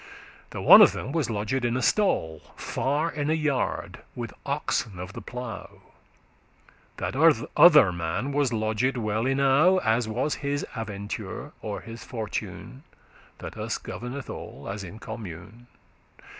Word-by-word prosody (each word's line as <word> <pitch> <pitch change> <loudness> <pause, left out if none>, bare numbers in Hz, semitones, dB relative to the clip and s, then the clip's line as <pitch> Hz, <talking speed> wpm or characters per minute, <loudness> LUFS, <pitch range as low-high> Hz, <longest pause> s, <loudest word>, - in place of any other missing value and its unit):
The - - -6
one - - +10
of - - +7
them 135 - -5
was 155 -5 -1
lodged 110 +4 -1
in 120 +1 +1
a - - -1
stall, 80 - +1
Far 145 +6 -1
in 145 0 -2
a 160 - +3
yard, 150 -4 -1 0.2
with - - -5
oxen 100 -5 -1
of 90 +2 -7
the - - -7
plough; 125 -3 -8 1.1
That - - -3 0.4
other 150 - +8
man 85 +10 -3
was 140 -3 +1
lodged 110 +4 0
well 110 +1 -1
enow, 140 +7 +4
As 110 -2 +1
was 125 +7 -1
his 145 0 -1
aventure, 105 +3 -5
or 105 -2 -5
his 115 0 -9
fortune, 115 +2 -6 0.6
That - - -8
us - - -2
governeth 125 +3 -7
all, 70 - -8
as 100 0 -5
in 95 +4 -9
commune. 110 +1 -9
120 Hz, 145 wpm, -26 LUFS, 105-140 Hz, 1.1 s, one